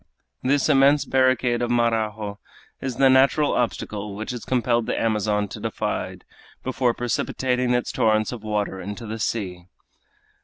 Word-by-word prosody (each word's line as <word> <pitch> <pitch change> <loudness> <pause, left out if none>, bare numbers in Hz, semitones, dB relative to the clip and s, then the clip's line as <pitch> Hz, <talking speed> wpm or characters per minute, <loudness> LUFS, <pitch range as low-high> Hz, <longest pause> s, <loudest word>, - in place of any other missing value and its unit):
This 140 +2 +2
immense 140 0 +4
barricade 130 -2 +2
of 120 - 0
Marajo 110 -3 0 0.4
is 130 -2 -3
the 135 +2 +5
natural 135 +3 +4
obstacle 105 -4 -2
which 110 +3 -4
has 120 -2 -7
compelled 120 -2 +1
the - - -1
Amazon 105 -2 +1
to - - -7
divide - - -3 0.4
before 125 -1 0
precipitating 125 +1 0
its 125 - -1
torrents 110 -1 +2
of 120 -3 -6
water 105 -3 -2
into 105 +5 -6
the 110 +1 -5
sea. 90 -6 -3
120 Hz, 145 wpm, -23 LUFS, 105-130 Hz, 0.4 s, the